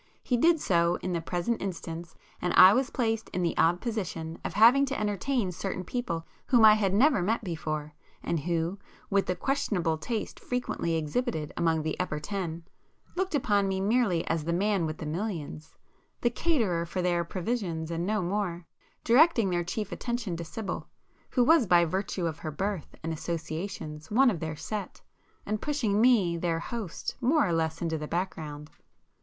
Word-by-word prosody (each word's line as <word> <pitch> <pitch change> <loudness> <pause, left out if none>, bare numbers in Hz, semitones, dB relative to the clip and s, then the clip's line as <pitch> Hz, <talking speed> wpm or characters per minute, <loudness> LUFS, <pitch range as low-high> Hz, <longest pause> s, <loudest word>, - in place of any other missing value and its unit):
He 250 - +1
did 325 +6 +4
so 170 -6 +2
in 185 - -1
the 170 - -1
present 180 +8 -2
instance, 170 -3 -5 0.3
and 180 - 0
I 185 +2 +10
was 260 +3 +1
placed 225 -3 -1
in 180 - 0
the 170 - 0
odd 170 +2 +3
position 175 -8 -4
of - - -4
having 235 +6 +7
to 275 - -2
entertain 210 +1 0
certain 185 +1 -4
people 175 -6 -3 0.2
whom 240 -4 +6
I 215 - +9
had 205 -3 +1
never 235 +2 +4
met 225 +6 0
before, 155 -4 -4 0.3
and 170 - 0
who, 170 +4 -1 0.3
with 200 0 +2
the 180 - 0
questionable 180 - 0
taste 225 +5 -4
frequently 245 -9 -2
exhibited 160 - -2
among 160 -2 +1
the 155 - -1
'upper 165 -4 -1
ten,' 170 -1 -4 0.5
looked 375 -2 -1
upon 205 -7 +2
[p 190 - -1
333] - - -1
me 205 +5 +1
merely 195 -10 +1
as 165 -1 0
"the 170 - 0
man 195 -1 +1
with 155 - -5
the - - -6
millions," 160 -2 -4 0.5
the 240 - +2
caterer 225 - +1
for 175 +2 -3
their 175 -1 +2
provisions, 175 -3 -3
and 165 0 -2
no 210 +1 0
more,—directing 205 - +1
their 175 -1 +1
chief 210 +5 -4
attention 235 -7 -3
to 170 - -5
Sibyl, 195 +5 -5 0.4
who 250 - +3
was 310 -3 +5
by 175 -1 +5
virtue 185 +1 -2
of 160 -1 -3
her 155 - -4
birth 190 +2 -3
and 165 0 -2
associations 160 -1 -5
one 250 +4 +5
of 175 - -4
their 160 -1 -4
'set,' 210 +5 -6 0.4
and 215 0 -2
pushing 230 -9 +1
me, 210 -9 +4
their 165 -1 0
host, 205 +2 -5
more 280 +3 +3
or 175 - 0
less 160 0 -1
into 160 -2 -1
the 150 - -5
background. 155 -4 -4
185 Hz, 180 wpm, -28 LUFS, 165-225 Hz, 0.5 s, I